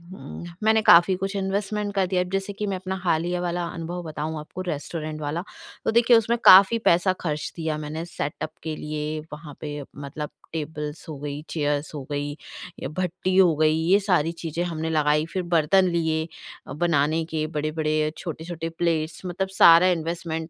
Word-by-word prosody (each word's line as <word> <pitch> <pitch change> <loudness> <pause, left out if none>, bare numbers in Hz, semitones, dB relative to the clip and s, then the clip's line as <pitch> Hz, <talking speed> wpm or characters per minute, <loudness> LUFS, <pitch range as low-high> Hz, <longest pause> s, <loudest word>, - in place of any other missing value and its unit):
उम, 195 - -9 0.2
मैंने 220 0 +4
काफ़ी 175 0 +7
कुछ 195 +2 -4
इन्वेस्टमेंट 200 +1 -2
कर 195 -1 +3
दिया 180 0 +1
है। 180 - -3
जैसे 195 +1 -2
कि 210 +1 -4
मैं 195 - -1
अपना 185 +1 -4
हालिया 175 +1 0
वाला 175 0 -2
अनुभव 175 +1 -5
बताऊँ 155 0 -4
आपको 155 +4 -8
रेस्टोरेंट 155 0 -4
वाला, 155 +4 -2 0.4
तो - - +2
देखिए 235 +1 +6
उसमें 230 +1 +1
काफ़ी 195 +4 +9
पैसा 175 +2 +4
खर्च 150 -3 -3
दिया 160 -2 -2
मैंने 155 +2 -5
सेटअप 155 -2 -4
के 160 -1 -3
लिए 150 0 -4
वहाँ 150 -2 -9
पे 145 -1 -5
मतलब 145 +1 -6 0.2
टेबल्स 150 -1 -5
हो 150 - -6
गई, 145 0 -5
चेयर्स 145 -1 -1
हो 145 - -5
गई 145 0 -2 0.5
या - - -4
भट्टी 185 +2 -2
हो 175 -5 +6
गई, 155 0 +3
ये 175 +5 +3
सारी 180 -5 +1
चीज़ें 165 0 -4
हमने 160 -2 -3
लगाई। 150 -1 +2
फिर 185 -1 -1
बर्तन 170 +2 +3
लिए 160 -1 0 0.4
अ, - - -6
बनाने 160 0 +1
के 160 -1 -2
बड़े-बड़े 155 0 -1
अ, - - 0
छोटे-छोटे 165 0 -5
प्लेट्स 165 -1 -1
मतलब 180 +2 -2
सारा 175 -1 +7
इन्वेस्टमेंट 165 -1 -2
165 Hz, 180 wpm, -24 LUFS, 155-185 Hz, 0.5 s, काफ़ी